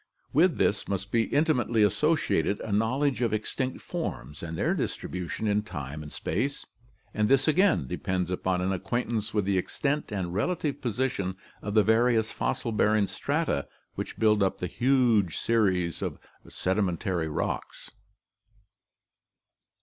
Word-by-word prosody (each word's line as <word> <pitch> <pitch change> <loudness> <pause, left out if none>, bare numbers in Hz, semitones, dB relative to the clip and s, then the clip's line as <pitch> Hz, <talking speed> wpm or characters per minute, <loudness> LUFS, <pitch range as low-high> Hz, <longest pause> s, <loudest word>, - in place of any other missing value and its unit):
With 165 +2 +4
this 100 - +1
must 100 0 -3
be 115 -1 +3
intimately 125 -8 +2
associated 145 - +2
a 110 - -5
knowledge 125 +4 +1
of 115 -3 +1
extinct 130 +4 -2
forms 70 +4 -5
and 85 -1 -5
their - - +1
distribution 90 +3 -3
in 105 0 +2
time 75 -7 -6
and 75 -1 -9
space, 135 - -2 0.5
and 105 0 +1
this 135 +2 +4
again 180 - +3
depends 90 +6 -2
upon 90 0 0
an 95 +1 0
acquaintance 110 +2 -2
with 105 -3 0
the 95 -1 +2
extent 140 +9 -1
and 95 -4 -3
relative 145 - -1
position 110 -6 -1 0.2
of 105 +1 -4
the 105 - +6
various 110 0 +3
fossil 115 - -2
bearing 105 -1 +3
strata 145 - -1 0.3
which - - -5
build 105 -2 +3
up 95 - +1
the - - -3
huge 120 - +2
series 95 -7 +1
of - - -3 0.3
sedimentary 90 -3 -1
rocks" 75 - -4
(Bartholomew). 110 - -34
105 Hz, 140 wpm, -28 LUFS, 95-125 Hz, 0.5 s, the